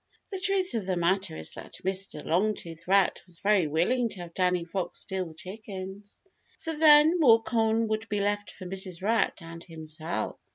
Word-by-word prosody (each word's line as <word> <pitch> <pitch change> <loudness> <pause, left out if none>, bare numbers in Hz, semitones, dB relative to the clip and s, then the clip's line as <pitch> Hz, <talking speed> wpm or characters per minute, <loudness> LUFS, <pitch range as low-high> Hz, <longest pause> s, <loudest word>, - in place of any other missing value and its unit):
The 385 - -3
truth 375 0 +1
of 215 -5 -2
the 185 - +1
matter 175 - 0
is 80 - -4
that - - -10
Mr. 190 -5 -2
Longtooth 170 -2 -1
Rat 195 0 +3
was 175 -2 -13
very 195 -2 +3
willing 230 - +1
to 190 - -8
have 170 -1 -9
Danny 180 -1 +1
Fox 175 0 -4
steal 190 -2 -3
the 160 - -12
chickens, 195 +1 -8 0.4
for 325 - -4
then 310 +2 +6
more 230 -7 +6
corn 225 -1 +1
would 220 +1 -2
be 205 - -1
left 205 0 0
for 185 - -10
Mrs. 185 -1 -4
Rat 225 +2 +2
and 165 0 -9
himself. 160 0 -5
195 Hz, 180 wpm, -28 LUFS, 175-225 Hz, 0.4 s, then